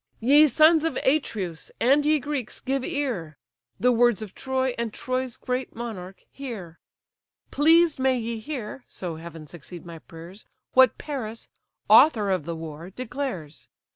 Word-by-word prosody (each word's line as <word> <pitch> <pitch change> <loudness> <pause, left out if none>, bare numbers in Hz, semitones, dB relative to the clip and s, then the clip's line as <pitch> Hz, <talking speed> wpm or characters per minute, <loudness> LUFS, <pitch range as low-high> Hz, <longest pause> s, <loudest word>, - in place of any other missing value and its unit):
"Ye 285 +6 +6
sons 310 +4 +5
of 325 -5 -1
Atreus, 210 - -1
and 275 +5 +4
ye 310 0 +4
Greeks, 275 -3 -3
give 270 0 -2
ear! 215 - -3 0.4
The 250 - +4
words 240 -2 +3
of 205 - -10
Troy, 260 -1 -1
and 235 -2 -2
Troy's 255 +1 -3
great 255 0 -4
monarch, 195 -6 -7
hear. 210 -12 -8 0.7
Pleased 325 +1 +4
may 260 -1 +2
ye 230 -1 -4
hear 250 -1 -6
(so 170 -4 -6
heaven 165 -1 -9
succeed 170 +3 -11
my 165 -1 -9
prayers) 170 +6 -12 0.3
What 260 -2 +5
Paris, 230 -7 -6 0.4
author 215 -10 +6
of 185 -6 -1
the 170 0 -4
war, 160 +1 -8
declares. 245 - -6
235 Hz, 145 wpm, -25 LUFS, 180-270 Hz, 0.7 s, Ye